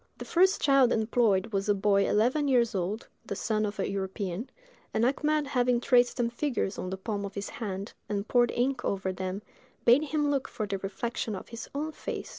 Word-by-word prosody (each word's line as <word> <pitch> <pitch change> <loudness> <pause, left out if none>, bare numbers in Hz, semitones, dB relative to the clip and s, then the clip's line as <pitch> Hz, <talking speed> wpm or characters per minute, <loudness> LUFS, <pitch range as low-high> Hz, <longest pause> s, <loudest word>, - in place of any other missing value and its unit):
The - - -7
first 375 +3 +3
child 275 -3 +5
employed 220 -2 +2
was 195 +1 0
a 205 - +4
boy 200 0 +2
eleven 255 +8 +2
years 245 -4 +3
old, 195 +4 -2 0.2
the - - -5
son 215 -1 0
of 205 - -6
a 195 - -1
European; 195 +2 -3 0.5
and 225 - +3
Achmed 300 +3 +1
having 250 -3 +2
traced 245 0 +3
some 235 -1 0
figures 240 -6 -2
on 185 - -3
the 190 - -4
palm 205 +1 -3
of 200 -1 -6
his 200 0 -4
hand, 200 -2 -5 0.2
and 205 0 -2
poured 240 -1 +4
ink 250 +1 0
over 190 -1 -1
them, 185 +2 -4 0.4
bade 255 +6 +6
him 295 -1 0
look 275 -2 0
for 215 - -4
the 200 -1 -3
reflection 210 +3 -3
of 185 - -9
his 230 0 -8
own 305 +2 -2
face. - - -6
225 Hz, 205 wpm, -29 LUFS, 200-255 Hz, 0.5 s, bade